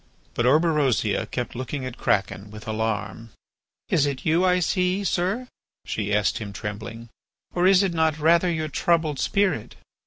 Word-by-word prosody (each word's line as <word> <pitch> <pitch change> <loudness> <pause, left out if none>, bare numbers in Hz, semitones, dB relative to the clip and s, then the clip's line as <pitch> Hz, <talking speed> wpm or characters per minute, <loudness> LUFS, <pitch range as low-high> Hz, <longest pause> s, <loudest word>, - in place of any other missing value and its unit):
But 120 - +1
Orberosia 145 - +2
kept 125 -1 -4
looking 130 +2 -4
at 130 -1 -6
Kraken 100 +1 0
with 110 +1 -11
alarm. 110 +1 -3 0.6
"Is 145 -2 +3
it 135 -3 -4
you, 165 +3 +3
I 180 -1 +3
see, 180 +2 0
sir," 195 +7 -1 0.4
she 105 -1 -3
asked 105 -1 +1
him, 105 -2 -6
trembling, 110 +3 -7 0.4
"or 180 +1 +3
is 195 0 +6
it 190 -3 0
not 160 -2 +1
rather 170 +3 +4
your 160 -2 -2
troubled 155 -2 +1
spirit?" 195 - 0
145 Hz, 155 wpm, -24 LUFS, 110-175 Hz, 0.6 s, is